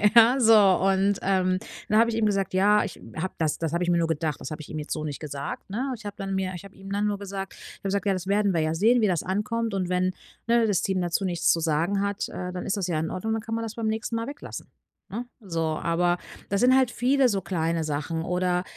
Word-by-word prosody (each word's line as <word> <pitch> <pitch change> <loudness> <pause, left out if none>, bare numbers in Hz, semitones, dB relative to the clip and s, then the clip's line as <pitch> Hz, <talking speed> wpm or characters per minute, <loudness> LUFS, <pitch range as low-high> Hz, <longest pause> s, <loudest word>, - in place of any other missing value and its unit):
Ja, 235 +3 +7
so 225 -2 +6 0.3
und, 195 +1 +2
ähm, 185 -1 +2 0.3
dann 215 +1 +5
habe 230 - +5
ich 225 - -1
eben 225 - +2
gesagt: 195 -3 0
„Ja, 205 +3 +4
ich 205 - -7
habe 180 +4 -3
das“ 155 -2 0
Das 165 -2 -1
habe 170 - +1
ich 175 - 0
mir 175 - +3
nur 165 - +1
gedacht, 155 -2 -2
das - - -6
habe 155 0 -5
ich - - -11
ihm 155 - -4
jetzt 150 - -7
so 155 -1 -4
nicht 145 -3 -4
gesagt, 145 +2 -6
ne? 255 +6 -2
Ich 220 -2 -14
habe 205 - -5
dann 195 -1 -3
mir 190 -1 -1
ich 175 - -9
habe 195 - -14
ihm 195 +1 -10
dann 205 +1 0
nur 205 -1 -1
gesagt 195 -1 -5
ich - - -12
habe - - -45
gesagt: 200 +1 -1
„Ja, 195 - +3
das 185 -1 -4
werden 200 0 +2
wir 165 - +2
ja 155 +1 0
sehen, 230 +8 +4
wie 215 - +4
das 175 -5 0
ankommt 210 +3 -1
und 185 -2 -1
wenn, 185 0 +1 0.3
ne, 235 0 +4
das 190 -3 +2
Team 190 -2 0
dazu 175 +2 0
nichts 175 -2 +2
zu 170 - +2
sagen 170 +5 +1
hat, 200 0 -1
äh, 180 0 -5
dann 180 0 -5
ist 195 - -1
das 190 -2 -1
ja 160 -3 0
in 160 - -2
Ordnung, 220 +4 -2
dann 225 - -1
kann 225 0 -4
man 230 - -2
das 225 -1 -5
beim 225 -2 -2
nächsten 220 +1 -2
Mal 230 0 -1
weglassen“, 290 +1 -8 0.4
ne? 235 +4 -4 0.2
So, 165 -5 -3
aber 170 +2 +1 0.3
das 200 +2 +1
sind 255 +1 +6
halt 260 -2 +4
viele 260 +1 +3
so 195 -2 0
kleine 165 -2 -1
Sachen 155 +2 -2
oder, 180 0 0
195 Hz, 275 wpm, -26 LUFS, 170-215 Hz, 0.4 s, Ja